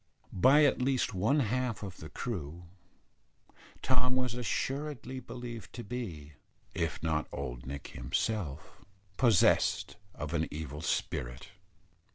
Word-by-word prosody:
By 135 +10 +7
at 140 - +3
least 130 0 +2
one 110 +11 +3
half 125 -1 0
of 95 -3 -6
the 80 - -8
crew, 90 - -4 1.2
Tom 125 0 +3
was 125 -2 +1
assuredly 130 +2 -2
believed 120 -5 -7
to 120 - -5
be 90 -11 -5 0.4
if 85 -2 -1
not 80 -2 +1
old 60 -3 -5
Nick 70 +1 -5
himself 80 - -2 0.3
possessed 115 -8 +4 0.2
of 75 +1 -4
an 80 -2 +1
evil 75 -1 -5
spirit. - - -2
100 Hz, 120 wpm, -32 LUFS, 75-125 Hz, 1.2 s, By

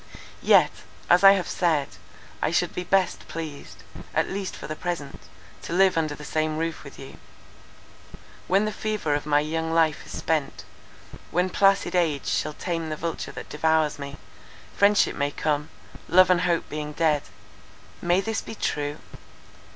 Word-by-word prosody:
"Yet, - - +5 0.4
as 175 +2 +6
I 195 0 +10
have 185 -3 -1
said, 160 -6 +1 0.5
I - - +1
should - - 0
be 180 - -3
best 190 0 +1
pleased, 155 -3 -8 0.3
at - - +2
least 195 -1 -4
for - - -9
the 155 - -5
present, 165 -5 -5 0.4
to - - -6
live 190 +1 +4
under 155 -2 0
the 150 - -10
same 155 0 -1
roof 165 0 -3
with 140 - -12
you. 135 - -11 1.3
When 195 +3 +3
the 215 - -1
fever 215 -8 -2
of 145 +1 -2
my 145 0 +4
young 160 +2 -2
life 165 -2 +2
is - - -8
spent; 155 -3 -1 0.7
when 180 +2 0
placid 195 +1 +3
age 160 -6 +1
shall 155 - -1
tame 165 0 -3
the 155 - -2
vulture 165 +1 -4
that - - -8
devours 155 0 +1
me, 140 0 -7 0.6
friendship 200 0 +4
may 145 0 0
come, 150 +1 -1 0.4
love 185 +1 +6
and 180 -1 +3
hope 175 -2 0
being 150 0 -5
dead. 155 -2 +2 0.8
May 175 +2 +2
this 225 +2 -2
be - - -8
true? 145 -6 -2
160 Hz, 165 wpm, -25 LUFS, 150-180 Hz, 1.3 s, I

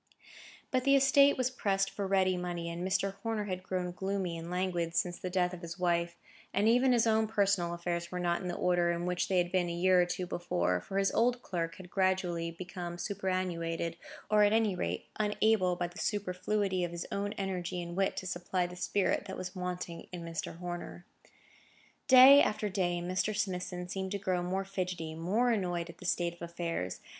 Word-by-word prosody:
But 255 -1 +1
the 275 +1 +5
estate 275 +1 +5
was 255 0 +1
pressed 195 -5 0
for 200 -1 -3
ready 190 -1 +3
money, 175 -1 -3
and 170 +1 -5
Mr. 195 +1 0
Horner 225 -1 -1
had 185 -3 -4
grown 185 -1 -3
gloomy 190 -1 -2
and 165 +1 -7
languid 175 -2 -1
since 175 -1 0
the 185 - -4
death 180 0 +1
of 175 - -8
his 170 -1 -7
wife, 170 -1 0 0.4
and 205 +2 +3
even 250 +3 +5
his 235 -2 +4
own 220 -1 +3
personal 200 -5 +1
affairs 170 0 -3
were 180 - -3
not 175 -1 0
in 185 - -4
the 175 - -3
order 175 -1 +2
in 170 0 -1
which 180 0 0
they 190 - +1
had 175 0 +1
been 180 -2 +1
a - - -2
year 180 +1 +4
or 175 - +1
two 180 +1 -3
before, 90 - -1
for 195 - -5
his 195 0 +2
old 245 +2 +2
clerk 165 -2 -3
had 180 -2 -12
gradually 185 -3 +1
become 175 0 -6
superannuated, 175 -3 -2 0.3
or, 215 0 +4
at 205 +1 +4
any 220 -3 +3
rate, 180 - -3
unable 210 -3 +2
by 175 - -1
the 175 +3 -8
superfluity 195 -1 -1
of 175 - -1
his 170 0 -5
own 205 +1 -2
energy 180 -3 -3
and 175 0 -5
wit 195 0 0
to - - -4
supply 180 0 -1
the 175 0 -7
spirit 195 +2 0
that 190 - -6
was 185 +1 -6
wanting 180 -2 -5
in 175 -2 -6
Mr. 165 0 -5
Horner. 175 0 -6 1.0
Day 265 +2 +10
after 210 0 0
day 175 -3 0
Mr. 190 +4 -1
Smithson 180 -3 -2
seemed 190 +1 -4
to - - 0
grow 185 -2 -1
more 190 +2 -2
fidgety, 180 -4 -3
more 200 +10 +1
annoyed 175 -5 -1
at 170 - -23
the 180 - -10
state 175 -1 0
of 175 - -20
affairs. 170 - -4
180 Hz, 205 wpm, -31 LUFS, 175-195 Hz, 1.0 s, Day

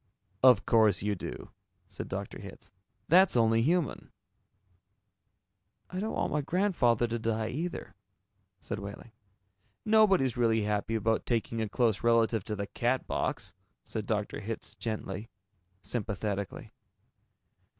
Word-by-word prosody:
"Of 125 -6 +6
course 110 -5 +4
you 105 0 +1
do," 95 - -7 0.4
said - - -7
Dr. - - -5
Hitz. - - -11 0.4
"That's 180 -3 +5
only 115 -1 +4
human." 165 +4 0 1.8
"I 185 - -3
don't 215 +3 -2
want - - -1
my 150 - +1
grandfather 145 - +2
to 115 0 -2
die, 110 0 -1
either," 165 +8 -4 0.7
said 110 +2 -5
Wehling. 100 +3 -9 0.7
"Nobody's 195 - +4
really 115 -2 +2
happy 105 +2 -1
about 110 0 0
taking 115 -1 -1
a 110 - -2
close 110 -1 +1
relative 115 -2 +3
to 105 - -3
the 100 0 -3
Catbox," 120 +5 -2 0.3
said - - -5
Dr. - - -2
Hitz - - -6
gently, 110 -2 -5 0.5
sympathetically. 100 -3 -3
115 Hz, 120 wpm, -30 LUFS, 105-130 Hz, 1.8 s, Of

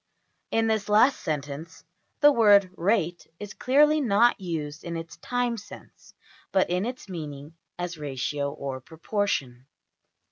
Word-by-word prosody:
In 225 0 +1
this 220 -2 0
last 220 +6 +5
sentence 150 +1 -5 0.4
the 295 - +8
word 205 -7 +5
\emph{rate} 175 -2 0
is 205 -1 -7
clearly 300 +4 +3
not 230 -2 +3
used 155 -4 -4
in 170 -1 -4
its 165 -2 -8
time 245 +5 -1
sense, 205 - -13 0.4
but 190 -2 +2
in 180 +5 0
its 250 -3 -7
meaning 150 -4 -7 0.2
as 175 -2 -5
ratio 140 0 -2
or 140 -3 -6
proportion. 155 - -3
180 Hz, 135 wpm, -26 LUFS, 150-220 Hz, 0.4 s, the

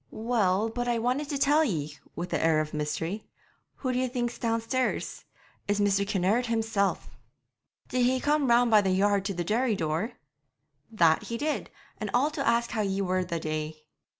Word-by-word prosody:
'Well, 220 -2 +1
but 245 +2 -3
I 240 -1 +1
want 255 +5 -1
to 285 - -1
tell 295 +3 +4
ye' 155 - -3 0.2
with 175 +1 -5
an - - +1
air 160 -1 +3
of 155 0 -3
mystery. 155 +6 -3 0.5
'Who 255 - -2
d'ye 255 +1 +1
think's 240 -1 -3
downstairs? 230 +2 -1 0.4
It's 205 0 +1
Mr. 200 -1 +2
Kinnaird 205 +5 +1
himself.' 225 -3 0 0.8
'Did 250 -1 +1
he 260 0 +2
come 295 0 +1
round 235 0 +4
by 215 -1 +7
the 195 - 0
yard 200 +1 +2
to 200 -2 -2
the 175 - -1
dairy 225 +5 +1
door?' 165 +7 -2 0.8
'That 170 -8 +3
he 230 - -4
did; 300 +4 -2 0.3
and 215 - -3
all 280 +5 +3
to 295 -3 -3
ask 235 0 +2
how 220 - -1
ye 195 -1 -1
were 185 0 0
the 170 -2 -3
day.' 155 0 -4
215 Hz, 180 wpm, -28 LUFS, 180-245 Hz, 0.8 s, by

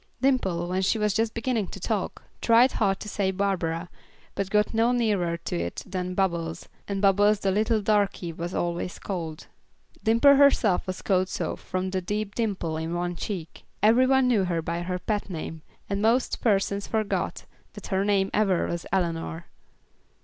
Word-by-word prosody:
Dimple, 195 -10 +1
when 185 +1 -1
she 190 +4 +2
was 210 -2 +1
just 225 0 0
beginning 230 -3 -1
to 195 - -9
talk, 205 +1 -3 0.2
tried 240 +3 +5
hard 195 -3 +1
to - - -6
say 200 -2 0
Barbara, 180 -4 -1 0.5
but 195 -1 -2
got 210 +2 +2
no 225 +2 +3
nearer 205 -8 +1
to - - -5
it 85 0 -3
than 185 -1 -4
Bubbles, 170 -4 -1 0.2
and 200 0 -3
Bubbles 205 +1 +4
the 195 - +1
little 215 +2 +1
darkey 200 -5 0
was 170 +2 -5
always 175 +1 -2
called. 165 -5 -5 0.6
Dimple 230 +6 +6
herself 245 -10 +4
was 185 0 -5
called 185 -1 +2
so - - -2
from 185 0 -4
the 185 -1 -1
deep 205 +2 -3
dimple 195 -9 -2
in 160 +2 -3
one 175 0 -2
cheek. 170 -3 -6 0.2
Every 235 +4 +5
one 265 -1 +4
knew 215 -6 +3
her 170 -2 -1
by 170 +1 -2
her 180 +1 -2
pet 205 +2 -2
name, 160 -2 -6 0.3
and 200 0 -2
most 235 +4 +1
persons 200 -2 +1
forgot 215 -2 -2 0.3
that - - -10
her 190 +1 +2
name 200 -1 +1
ever 195 -4 +2
was 170 0 -4
Eleanor. 170 -2 -1
195 Hz, 175 wpm, -26 LUFS, 175-215 Hz, 0.6 s, Dimple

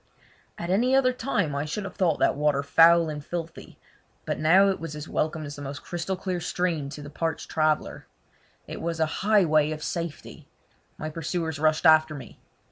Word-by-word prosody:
At 170 +1 -4
any 245 +7 +3
other 255 -1 +3
time 230 - -1
I 140 +1 -2
should 175 +7 -4
have 195 - -7
thought 170 -5 +1
that - - +2
water 145 -1 +1
foul 165 +3 +5
and 150 -2 -5
filthy, 165 +1 -7 0.5
but - - -3
now 185 +6 +5
it 195 - -1
was 165 -2 -6
as 150 +1 -7
welcome 155 0 -2
as 145 0 -7
the - - -8
most 140 0 -7
crystal 175 +2 -4 0.2
stream 165 -4 -2
to 145 +1 -8
the 145 - -8
parched 165 +1 -3
traveller. 155 -1 0 0.6
It - - -7
was 165 0 -3
a 160 - +3 0.2
highway 175 -8 +3
of 155 0 -5
safety! 170 -3 -6 0.5
My 155 0 -5
pursuers 160 -1 -3
rushed 155 +2 +1
after 155 -1 +5
me. 130 -5 -11
160 Hz, 185 wpm, -26 LUFS, 150-175 Hz, 0.6 s, foul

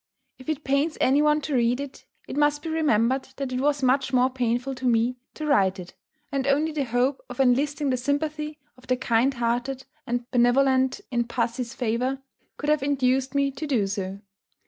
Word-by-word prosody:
If 260 - -9
it 310 -1 -2
pains 280 +4 +1
any 275 +3 +4
one 300 0 +3
to 295 - -4
read 245 0 +2
it, 280 -1 -8 0.2
it - - -6
must 295 0 +2
be 325 - -4
remembered 265 -5 +1
that 275 -2 -4
it 255 0 -1
was 285 0 +1
much 260 +1 +2
more 255 0 +3
painful 250 +1 -1
to 255 0 -3
me 240 +1 +2 0.2
to 310 - -5
write 195 -10 +3
it; 180 -1 -9 0.4
and 275 -1 -1
only 295 +3 +2
the 295 -3 -1
hope 250 +3 0
of 250 - -9
enlisting 275 +2 +2
the 255 - +1
sympathy 300 +3 -2 0.2
of 255 0 -19
the 255 0 +1
kind 250 +2 +2
hearted 245 +3 -1 0.2
and 240 0 -1
benevolent 260 +4 +3
in 240 -1 +1
pussy's 235 0 -2
favour 250 +3 -1 0.4
could 295 - -3
have 305 -2 +2
induced 265 -1 +1
me 280 0 +2
to 275 +3 -6
do 245 -8 +1
so. 195 0 -4
260 Hz, 190 wpm, -25 LUFS, 245-285 Hz, 0.4 s, any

